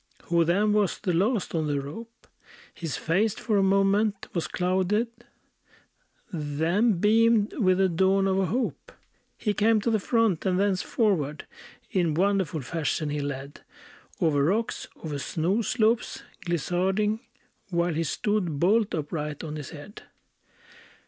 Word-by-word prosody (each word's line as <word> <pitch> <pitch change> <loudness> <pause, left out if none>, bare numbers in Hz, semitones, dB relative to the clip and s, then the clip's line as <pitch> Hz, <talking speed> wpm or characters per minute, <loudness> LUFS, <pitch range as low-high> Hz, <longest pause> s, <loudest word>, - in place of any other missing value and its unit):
Who 170 0 +2
then 200 +6 +2
was 210 -3 +1
the 185 -4 -2
last 205 +5 +1
on 160 -2 0
the 145 -1 0
rope; 225 +12 -9 0.5
His 165 -4 -4
face 200 +6 +1
for 215 -3 0
a - - +4
moment 195 +1 +2
was 170 - -1
clouded, 190 +5 0 1.2
Then 165 +8 +1
beamed 215 +3 +3
with 185 -4 +3
the 190 0 +4
dawn 190 +3 +2
of 190 0 +1
a 190 - +2
hope; 245 +7 -3 0.4
He 210 - -1
came 215 +2 +3
to 230 - 0
the 220 - +2
front, 225 -4 +1
and 185 -1 +1
thence 195 -2 +1
forward 160 - 0 0.5
In 170 -5 +1
wonderful 190 -4 +1
fashion 155 +2 -2
he 150 - -2
led, 140 0 -5 0.6
Over 145 -4 +2
rocks, 210 +9 -1 0.2
over 150 -3 -4
snow 170 - 0
slopes 225 +1 0 0.2
glissading, 185 +6 0 0.5
While 170 -1 0
he 165 +2 0
stood, 175 -2 -1
bolt 205 +4 +2
upright 150 -1 -4
on 155 -1 -5
his 150 -3 -6
head! 160 +6 -11
185 Hz, 140 wpm, -26 LUFS, 160-210 Hz, 1.2 s, a